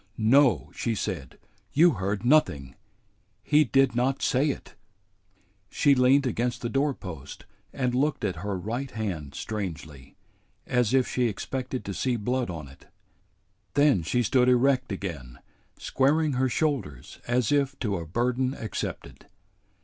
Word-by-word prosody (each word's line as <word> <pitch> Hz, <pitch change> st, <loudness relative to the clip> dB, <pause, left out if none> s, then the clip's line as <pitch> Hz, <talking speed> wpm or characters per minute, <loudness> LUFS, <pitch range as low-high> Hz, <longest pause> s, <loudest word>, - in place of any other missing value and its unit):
"No," 110 Hz, -, +3 dB
she 115 Hz, -2 st, -2 dB
said, 70 Hz, -, -5 dB, 0.4 s
"you 170 Hz, +4 st, +6 dB
heard 100 Hz, -1 st, -3 dB
nothing. 75 Hz, -, +2 dB, 0.7 s
He 150 Hz, +1 st, +4 dB
did 135 Hz, -2 st, +2 dB
not 130 Hz, +3 st, 0 dB
say 135 Hz, +4 st, +2 dB
it!" -, -, -6 dB, 1.0 s
She 145 Hz, -, +3 dB
leaned 135 Hz, +2 st, +4 dB
against 120 Hz, 0 st, -2 dB
the 120 Hz, -, -1 dB
doorpost 95 Hz, -, -3 dB, 0.3 s
and 125 Hz, -2 st, -1 dB
looked 140 Hz, -2 st, 0 dB
at 95 Hz, -4 st, -2 dB
her 100 Hz, +2 st, -3 dB
right 120 Hz, +9 st, -4 dB
hand 90 Hz, -, -5 dB
strangely, 75 Hz, -10 st, -6 dB, 0.5 s
as 125 Hz, -1 st, +1 dB
if 130 Hz, -1 st, +3 dB
she 125 Hz, -1 st, 0 dB
expected 130 Hz, +4 st, -4 dB
to 100 Hz, -, -4 dB
see 125 Hz, +5 st, -1 dB
blood 125 Hz, +2 st, -1 dB
on 80 Hz, -5 st, -6 dB
it. 70 Hz, -, -17 dB, 0.9 s
Then 145 Hz, -, +4 dB
she 120 Hz, +10 st, 0 dB
stood 125 Hz, +3 st, +3 dB
erect 130 Hz, 0 st, +2 dB
again, 80 Hz, -11 st, -6 dB, 0.4 s
squaring 150 Hz, +3 st, +1 dB
her 130 Hz, +1 st, +1 dB
shoulders 125 Hz, -, -2 dB
as 120 Hz, -2 st, +1 dB
if 140 Hz, -1 st, +1 dB
to 105 Hz, -5 st, -1 dB
a 85 Hz, -1 st, -6 dB
burden 125 Hz, -, 0 dB
accepted. 110 Hz, -, -6 dB
120 Hz, 140 wpm, -26 LUFS, 95-135 Hz, 1.0 s, you